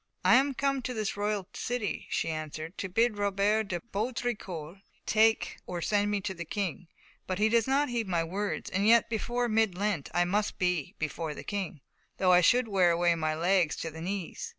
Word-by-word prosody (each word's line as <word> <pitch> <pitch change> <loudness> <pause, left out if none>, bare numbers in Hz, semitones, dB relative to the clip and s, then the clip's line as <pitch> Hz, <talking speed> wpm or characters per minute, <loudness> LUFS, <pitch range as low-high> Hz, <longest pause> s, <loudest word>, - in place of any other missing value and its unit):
"I - - +6
am 275 +1 +4
come 275 0 0
to 250 +1 -4
this 215 -2 -2
royal 205 -2 -1
city," 240 -6 -3
she - - -1
answered, 155 +2 -5
"to 190 - -3
bid 225 +2 +1
Robert 205 +2 +1
de 175 -3 -3
Baudricourt 200 -7 -3 0.3
take 220 +1 +3
or 175 - -4
send 205 +3 +1
me 205 -1 0
to 190 0 -3
the 170 -2 -6
King, 180 -1 -4 0.4
but 185 - -2
he 215 +2 +3
does 230 0 +3
not 280 +2 +2
heed 235 -3 -2
my 170 -3 +1
words; 195 +5 -3
and 200 +2 +1
yet 230 0 +5
before 240 +2 -1
mid 220 -4 +2
Lent 200 -7 -1
I 175 +1 +2
must 205 +4 0
be 180 -6 -1
before 155 0 -3
the - - -8
King, 195 -7 -4 0.4
though 185 -1 +3
I 180 0 +7
should 245 +6 +4
wear 190 -4 +3
away 170 0 +3
my 155 -2 -1
legs 175 -1 +2
to 165 - -5
the 160 +1 -9
knees. 185 0 -4
200 Hz, 200 wpm, -29 LUFS, 175-220 Hz, 0.4 s, I